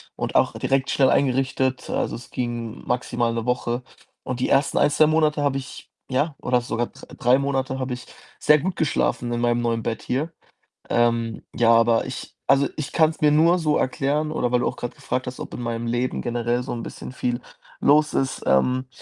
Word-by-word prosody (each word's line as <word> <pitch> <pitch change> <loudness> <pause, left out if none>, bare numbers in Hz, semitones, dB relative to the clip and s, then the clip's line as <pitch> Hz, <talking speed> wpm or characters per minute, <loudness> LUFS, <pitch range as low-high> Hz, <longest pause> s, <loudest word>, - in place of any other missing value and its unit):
und - - -3
auch - - +3
direkt 135 0 0
schnell 135 -2 +3
eingerichtet. 130 -1 +1
Also, - - -1
es 120 - -11
ging 120 -2 -4
maximal 120 -1 0
'ne 115 0 -3
Woche 125 0 -1 0.4
und 125 -1 -4
die - - 0
ersten 140 0 +2
1, 145 - +4
2 155 +1 +4
Monate 155 -2 +2
habe 140 -1 +1
ich 135 - -10 0.2
ja, 145 +4 +1
oder 125 0 +1
sogar 120 0 -2
dr - - -14
3 125 +2 +4
Monate 135 -1 -1
habe 130 -1 -2
ich 125 - -8 0.3
sehr 150 0 +5
gut 180 +4 -2
geschlafen 120 -5 0
in 120 0 -1
meinem 120 0 +2
neuen 115 -1 -1
Bett 115 - -3
hier. 150 +6 -2 0.6
Ähm, 115 -1 +1
ja, 115 -1 +4
aber 115 0 +4
ich 130 - -7 0.2
also, 140 +1 +4
ich 150 - -4
kann's 160 -1 +2
mir 150 -1 +5
nur 165 +4 +5
so 150 -2 +2
erklären 145 +4 0
oder 125 -5 -1
weil 125 - +3
du - - 0
auch - - -2
grad 120 - -5
gefragt 130 0 -3
hast, 125 - -6
ob - - -7
in - - -6
meinem 115 0 -3
Leben 120 +2 -1
generell 120 0 -1
so 130 - -4
'n 115 - -5
bisschen - - -8
viel 125 -1 -2 0.4
los 150 +2 +4
ist, 135 0 -1
ähm. 125 - +2
125 Hz, 205 wpm, -23 LUFS, 120-140 Hz, 0.6 s, sehr